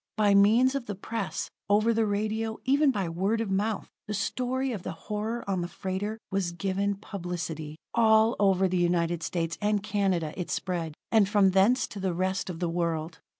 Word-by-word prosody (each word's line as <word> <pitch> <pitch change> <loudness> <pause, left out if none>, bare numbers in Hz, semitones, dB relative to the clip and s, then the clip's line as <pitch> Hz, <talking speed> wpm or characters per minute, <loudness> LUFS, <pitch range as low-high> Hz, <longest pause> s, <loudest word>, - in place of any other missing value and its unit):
By 205 -2 +4
means 220 +6 +5
of 275 -3 -3
the 205 - -3
press, 200 -4 -4 0.2
over 215 +3 +4
the 225 -1 +1
radio, 215 +2 -1
even 280 +3 +4
by 200 -8 0
word 190 +7 0
of 225 -4 -2
mouth, 205 +2 -1 0.2
the 210 - -2
story 255 +5 -1
of 210 -6 -4
the - - -5
horror 215 +7 -4
on 190 -2 0
the 175 - -2
freighter 195 +4 -4
was 190 -3 -1
given 200 +2 -1
publicity. 170 -6 -5 0.2
All 220 0 +5
over 195 -2 +4
the 185 0 0
United 175 -1 +1
States 165 -1 -2
and 210 -1 +1
Canada 190 -7 0
it 180 - -4
spread, 170 -4 -2 0.2
and 215 -4 +4
from 200 -2 +4
thence 205 +7 +4
to 205 - -7
the 190 -2 -1
rest 190 +2 -1
of 175 - -5
the 175 - 0
world. 165 -1 -2
195 Hz, 190 wpm, -28 LUFS, 175-220 Hz, 0.2 s, means